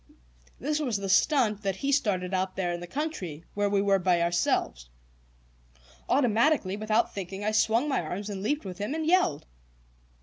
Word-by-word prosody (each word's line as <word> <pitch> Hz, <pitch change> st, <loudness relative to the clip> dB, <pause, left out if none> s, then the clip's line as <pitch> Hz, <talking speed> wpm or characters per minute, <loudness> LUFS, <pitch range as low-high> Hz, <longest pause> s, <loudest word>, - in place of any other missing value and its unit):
This 300 Hz, +3 st, -1 dB
was 250 Hz, -8 st, -1 dB
the 200 Hz, 0 st, -4 dB
"stunt" 215 Hz, -1 st, +3 dB
that 195 Hz, -2 st, -1 dB
he 275 Hz, +8 st, -2 dB
started 195 Hz, -9 st, 0 dB
out 185 Hz, 0 st, -1 dB
there 175 Hz, -2 st, -1 dB
in 175 Hz, -, -4 dB
the 175 Hz, -, -8 dB
country, 190 Hz, -, -4 dB
where 205 Hz, 0 st, 0 dB
we 200 Hz, -1 st, +2 dB
were 195 Hz, -1 st, +3 dB
by 180 Hz, -1 st, +2 dB
ourselves. 60 Hz, -, 0 dB, 1.2 s
Automatically, 240 Hz, -4 st, +2 dB
without 215 Hz, +2 st, 0 dB
thinking, 195 Hz, +1 st, -5 dB
I 215 Hz, -, +1 dB
swung 225 Hz, +5 st, +2 dB
my 275 Hz, -, 0 dB
arms 180 Hz, +5 st, -5 dB
and 200 Hz, -2 st, -5 dB
leaped 290 Hz, +9 st, -1 dB
with 185 Hz, -1 st, -7 dB
him 210 Hz, +9 st, -2 dB
and 320 Hz, -1 st, -2 dB
yelled. 335 Hz, -, +2 dB
205 Hz, 175 wpm, -28 LUFS, 185-255 Hz, 1.2 s, stunt